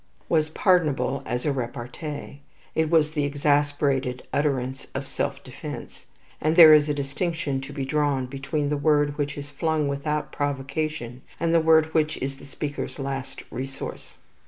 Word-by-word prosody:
was 155 -2 +2
pardonable 155 - +2
as 125 0 -2
a 150 - +2
repartee. 135 +4 -5 0.3
It 160 -1 +1
was 155 -2 +4
the 150 -2 0
exasperated 145 -2 +1
utterance 135 -3 -1
of - - -3
self - - -3
defence; - - -8 0.3
and 155 +1 +2
there 160 -3 +11
is 150 0 +5
a - - +2
distinction 140 0 -2
to 135 +1 -8
be 140 -2 -3
drawn 145 -2 +1
between 140 +3 -2
the 150 - 0
word 145 0 +2
which 145 0 -1
is 145 0 -7
flung 155 0 0
without 150 +2 -2
provocation, 140 -2 -3 0.2
and 165 0 +1
the 165 - +5
word 160 0 +4
which 155 -1 +2
is 135 +1 -4
the - - -12
speaker's 145 +1 -5
last 135 -1 -5
resource. 135 +1 -6
145 Hz, 160 wpm, -25 LUFS, 135-155 Hz, 0.3 s, there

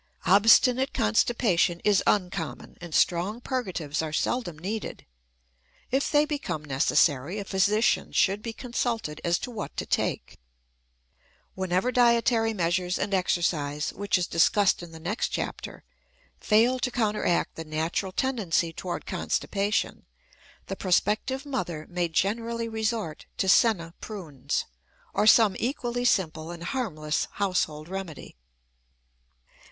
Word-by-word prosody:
Obstinate 225 +7 +5
constipation 175 - +2
is 205 -2 +3
uncommon, 180 -4 -1
and 175 -1 -8
strong 185 +6 +2
purgatives 185 - -3
are 160 -1 -4
seldom 175 +1 -1
needed. 205 +7 -5 0.9
If 270 +2 +1
they 295 0 +4
become 185 - -4
necessary, 140 +4 +2
a 200 - -4
physician 210 +4 +2
should 200 +2 +2
be 230 - -4
consulted 230 - -3
as 170 0 +2
to 250 - -6
what 215 -3 -6
to - - -2
take. - - -2 1.1
Whenever 190 +5 0
dietary 235 -2 +3
measures 180 -2 0
and 205 - -2
exercise, 155 -5 0
which 200 0 0
is 180 - 0
discussed 185 +5 +3
in 175 -1 -9
the 160 - -10
next 195 +8 -2
chapter, - - -5 0.6
fail 235 +4 +3
to 250 - 0
counteract 210 -7 0
the 165 - -7
natural 160 +5 -2
tendency 185 -9 0
toward 175 +2 -5
constipation, 205 +1 -1 0.6
the 195 - -5
prospective 215 +9 0
mother 175 - -3
may 175 -1 -1
generally 230 +7 -1
resort 220 -7 -3
to 190 - 0
"senna 190 -5 +3
prunes" 150 - -4 0.5
or 215 - +2
some 220 -3 +6
equally 245 -1 -2
simple 165 -7 +1
and 170 -1 -7
harmless 165 - -2
household 170 -6 -1
remedy. 185 -4 -7
195 Hz, 125 wpm, -27 LUFS, 170-230 Hz, 1.1 s, some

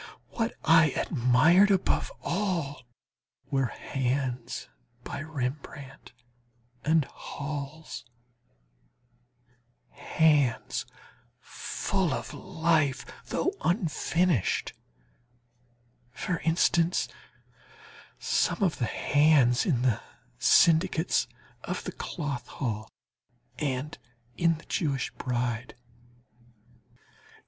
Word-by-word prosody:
What 230 0 -2
I 160 -1 +7
admired 150 - +4
above 195 -2 +1
all 170 - -2 0.6
were 135 -2 +2
hands 125 -2 -3 0.4
by - - -5
Rembrandt 140 -2 -6 0.7
and 155 -1 +3
Hals, 145 +3 -6 1.9
hands 150 -7 +1 0.5
full 190 -7 -2
of - - -6
life, 160 -6 +1 0.2
though 370 - 0
unfinished; 170 - +1 1.4
for 165 +6 -3
instance, 165 +2 +2 1.1
some 210 - +1
of 180 - +1
the 120 - +1
hands 145 - +3
in 125 -8 +1
the 125 -5 +2 0.4
"Syndics 170 - +4 0.4
of - - -4
the - - -4
Cloth 140 -7 -4
Hall," 110 -5 -4 0.7
and 140 +1 -2 0.4
in 170 -2 +2
the 155 - -15
"Jewish 140 -5 -1
Bride." 125 -1 -3
150 Hz, 75 wpm, -28 LUFS, 130-170 Hz, 1.9 s, I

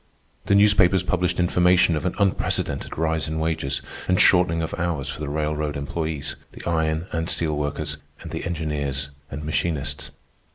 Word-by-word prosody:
The 100 - +4
newspapers 100 -3 +5
published 90 0 0
information 90 -1 +4
of 75 - -3
an 90 - -2
unprecedented 100 -2 0
rise 80 -2 0
in 80 +1 -3
wages 80 -3 -1 0.2
and 90 0 +3
shortening 85 -3 +5
of 80 - -4
hours 80 -6 -1
for 70 - -5
the 75 -2 -3
railroad 75 0 -1
employees, 80 +1 -3 0.2
the - - -10
iron 80 -1 0
and 80 +1 -2
steel 80 -3 0
workers, 75 0 -2 0.2
and - - -8
the - - -4
engineers 75 -4 -2 0.2
and 75 +2 -6
machinists. 75 -1 -1
80 Hz, 160 wpm, -24 LUFS, 75-85 Hz, 0.2 s, newspapers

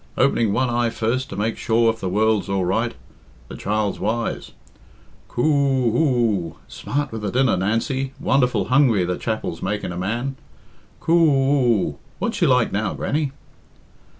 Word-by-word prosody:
Opening 115 -3 +2
one 130 +5 +1
eye 120 -1 +1
first 120 +4 -2
to - - -6
make 110 +3 -2
sure 115 +1 +2
if 115 - -15
the 95 - -3
world's 105 +1 +1
all 95 -2 0
right. 115 +6 0 0.5
The - - -7
child's 105 -1 -1
wise. 115 +2 -2 0.7
Coo 120 - -2
oo 135 -6 +2
oo! 115 - +1
Smart 145 -1 -3
with 110 -1 -5
the 105 - -2
dinner, 130 +2 +2
Nancy 130 +8 -1
wonderful 125 -7 +2
hungry 125 -8 +4
the 90 0 -2
chapel's 110 -7 -3
making 100 -1 -2
a 85 - -6
man. 120 +8 -2 0.6
Coo 165 - +1
oo! 135 - +3 0.2
What's - - -2
she - - +3
like, - - +3
now, - - -1
Grannie?" 145 -2 -1
115 Hz, 155 wpm, -22 LUFS, 105-135 Hz, 0.7 s, hungry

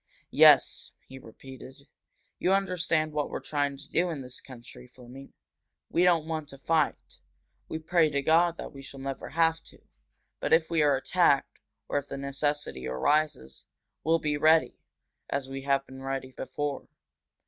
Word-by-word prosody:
"Yes," - - +6 0.2
he 130 0 -11
repeated. 135 +3 -13 0.5
"You 185 - +2
understand 170 -5 0
what 150 -1 -1
we're - - -4
trying 145 -2 -2
to 140 +1 -11
do 175 +1 0
in 155 -5 -4
this 125 -1 -9
country, 125 -1 -13
Fleming. 125 +2 -13 0.6
We - - +2
don't 170 -3 +3
want 160 -2 -4
to 135 - -11
fight 155 +2 -1 0.5
we - - -3
pray 160 0 +2
to 140 -1 -1
God 170 +3 +3
that - - -8
we 135 - -10
shall 135 0 -11
never 135 0 -5
have 165 0 +1
to. - - -16 0.6
But, - - 0
if 160 0 +3
we 165 -2 +2
are 145 -2 +4
attacked, 140 0 +1 0.3
or 145 - 0
if 140 - -11
the - - -6
necessity 140 - -2
arises, 135 - -1 0.4
we'll 165 +1 +3
be 150 -2 -1
ready, 160 +2 +4 0.6
as 140 -1 -2
we 135 0 -5
have 140 -1 +1
been 130 0 -12
ready 135 -1 -4
before. 140 +2 -5
145 Hz, 165 wpm, -28 LUFS, 135-160 Hz, 0.6 s, Yes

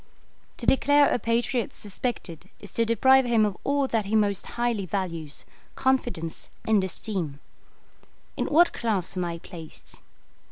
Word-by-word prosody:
To - - -5
declare 285 +1 +4
a - - +1
patriot 235 +1 0
suspected 205 -5 -5
is 205 - -9
to 230 - +1
deprive 260 +4 +5
him 230 -3 +4
of 205 -3 -1
all 280 -1 +1
that 225 -3 0
he 210 +3 -1
most 205 -3 +1
highly 235 -5 0
values 165 -6 -3 0.3
confidence 240 -11 -1 0.2
and 215 -3 +4
esteem. 180 -6 -3 1.0
In - - -1
what 340 +4 +5
class 205 -7 0
am 180 - -1
I 170 -1 -3
placed? 165 -2 -9
215 Hz, 145 wpm, -26 LUFS, 185-240 Hz, 1.0 s, deprive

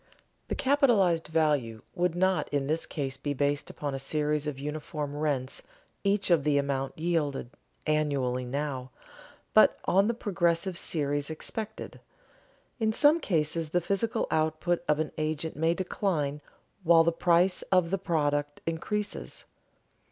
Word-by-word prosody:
The - - -2
capitalized 235 - +3
value 145 -8 0
would 175 -1 0
not 185 +1 +1
in 140 -1 0
this 155 +3 0
case 135 -3 -3
be 145 +1 -3
based 145 +1 0
upon 145 -2 -4
a 135 - -3
series 150 +1 -1
of 145 -3 -3
uniform 150 0 -4
rents 145 -4 -1 0.4
each 200 -2 +1
of 165 -5 +4
the 145 -1 +2
amount 135 -1 -1
yielded 155 -7 -1 0.3
annually 140 -5 0
now, 130 0 -3 0.6
but - - +6
on 195 +3 +4
the 235 - 0
progressive 180 -3 0
series 145 -3 -1
expected. 210 +7 -6 0.8
In 220 -1 +2
some 295 +8 +4
cases 160 - 0
the 175 - +2
physical 200 +5 -1
output 155 +2 0
of 150 - +3
an 155 0 -2
agent 155 +1 -2
may 165 +2 +1
decline 160 -6 -1 0.4
while 165 -2 +6
the 170 - +3
price 175 +2 +3
of 180 -2 +3
the 195 - 0
product 145 -4 0
increases. 205 +6 -3
155 Hz, 140 wpm, -28 LUFS, 145-175 Hz, 0.8 s, but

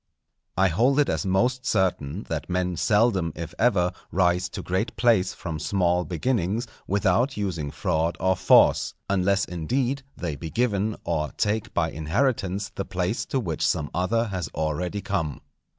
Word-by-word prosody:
_ - - -58 0.5
I 95 +1 +4
hold 125 - +3
it 145 - +3
as 100 - -1
most 125 +7 +1
certain 95 - 0
that 80 +1 -4
men 90 0 0
seldom 105 -3 +2
if 85 0 -6
ever 90 -7 +3 0.2
rise 90 -1 +2
to - - -6
great 95 +6 -1
place 110 -6 +3
from 80 -4 -5
small 90 +1 +1
beginnings 105 +3 -1 0.2
without 100 +7 +1
using 85 -8 -2
fraud 80 +3 -1
or 95 0 +2
force, - - +4 0.2
unless, 100 +1 +2
indeed, 125 - -1 0.2
they 80 -4 -3
be 80 +3 -6
given, 105 +1 0
or 75 -3 -2
take 105 0 0
by 80 -5 +1
inheritance 95 - -1
the 100 - -3
place 90 +4 -2
to 135 - 0
which 85 -10 -3
some 75 -1 0
other 105 +6 +1
has 90 -6 -3
already 85 +6 -2
come. 90 -6 -2
95 Hz, 160 wpm, -25 LUFS, 85-110 Hz, 0.5 s, I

